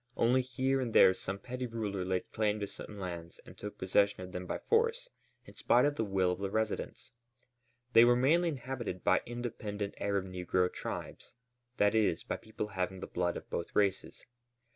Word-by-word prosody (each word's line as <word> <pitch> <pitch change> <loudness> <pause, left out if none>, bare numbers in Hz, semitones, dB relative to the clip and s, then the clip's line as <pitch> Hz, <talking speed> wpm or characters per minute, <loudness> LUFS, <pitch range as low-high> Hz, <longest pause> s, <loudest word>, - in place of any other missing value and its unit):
Only 125 +3 +4
here 130 +1 0
and 120 -3 -3
there 95 - +8
some 95 +1 -4
petty 125 +4 -5
ruler 105 -5 -3
laid 90 0 -2
claim 105 -1 0
to - - 0
some 105 +1 -9
lands 85 -3 -6
and - - -13
took 105 0 -8
possession 100 +1 +2
of 90 - -8
them 90 0 -5
by - - -2
force 465 +2 +1 0.3
in - - -14
spite 125 +2 +4
of 145 - +2
the 115 - -1
will 95 -3 +1
of 90 - -3
the 100 0 -2
residents. 110 +1 -3 0.8
They 115 - +9
were 120 0 +6
mainly 160 +8 +3
inhabited 125 - -5
by 95 - +4
independent 110 -4 -4
Arab 100 -1 0
negro 90 0 0
tribes, - - -6 0.4
that 105 0 +4
is, 110 -7 +2
by - - -3
people 110 -1 -6
having 95 -1 -3
the - - -5
blood 90 0 -1
of - - -10
both 85 - -4
races. 100 -2 0
105 Hz, 185 wpm, -32 LUFS, 95-120 Hz, 0.8 s, They